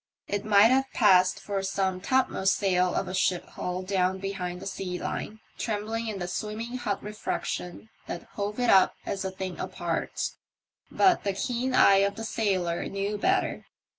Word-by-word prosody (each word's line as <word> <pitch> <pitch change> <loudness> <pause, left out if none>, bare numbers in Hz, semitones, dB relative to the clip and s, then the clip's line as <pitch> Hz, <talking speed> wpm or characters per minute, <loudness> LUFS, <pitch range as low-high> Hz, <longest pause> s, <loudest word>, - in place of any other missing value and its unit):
It 205 0 -2
might 210 +1 +6
have 265 +1 +2
passed 185 -4 +5
for 200 -1 -3
some 190 -1 -1
topmost 200 -4 +2
sail 185 -2 +1
of - - -1
a 185 - -5
ship 185 -1 +1
hull 180 +1 -4
down 185 -1 +1
behind 185 -2 -4
the - - -9
sea 190 -2 -4
line, 215 +4 -5 0.2
trembling 225 +1 -2
in 215 -2 -3
tho 175 - -3
swimming 215 +6 -4
hot 210 -5 -3
refraction 210 -1 -4 0.2
that 170 - -5
hove 205 +2 -3
it 245 - +3
up 190 -1 +5
as 195 - -3
a 190 - -1
thing 190 -1 -6
apart. - - -3 0.6
But 370 -2 +3
the 200 - 0
keen 250 +5 -1
eye 195 -5 +7
of 200 +1 +2
the 225 - -6
sailor 185 -6 0
knew 200 +1 -3
better. - - 0
200 Hz, 170 wpm, -27 LUFS, 185-215 Hz, 0.6 s, eye